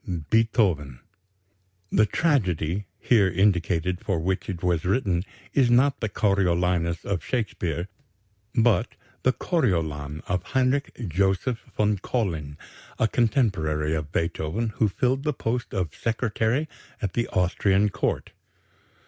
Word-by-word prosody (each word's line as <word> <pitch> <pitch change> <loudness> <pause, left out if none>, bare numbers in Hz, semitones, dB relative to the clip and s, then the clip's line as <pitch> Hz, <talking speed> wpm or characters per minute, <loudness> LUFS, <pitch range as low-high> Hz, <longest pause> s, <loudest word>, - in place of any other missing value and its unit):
Beethoven_." 100 - +2 0.9
The 105 0 +4
"tragedy" 100 - 0
here 105 -6 +4
indicated 90 -1 +1
for 95 -5 0
which 95 +3 -2
it 90 -2 -5
was 85 -3 +1
written 90 -3 +1 0.3
is 130 -4 +4
not 130 +4 +4
the 110 - -2
"Coriolanus" 90 -4 +1
of 95 -5 -2
Shakespeare, 90 - -2 0.7
but 115 -2 +2 0.3
the 130 - +3
"Coriolan" 80 - -1
of 90 0 -1
Heinrich 130 +1 0
Joseph 95 - +1 0.2
von 105 -1 +2
Collin, 80 - -2 0.4
a 115 - +3
contemporary 90 - +1
of 75 -1 -3
Beethoven, 85 +7 -1
who 110 0 +1
filled 130 +7 0
the 150 +1 -1
post 120 -1 -2
of 90 -4 -2
Secretary 115 +4 0 0.3
at 100 -6 -3
the 120 - 0
Austrian 95 +3 +2
Court. - - -2
100 Hz, 120 wpm, -25 LUFS, 85-115 Hz, 0.9 s, The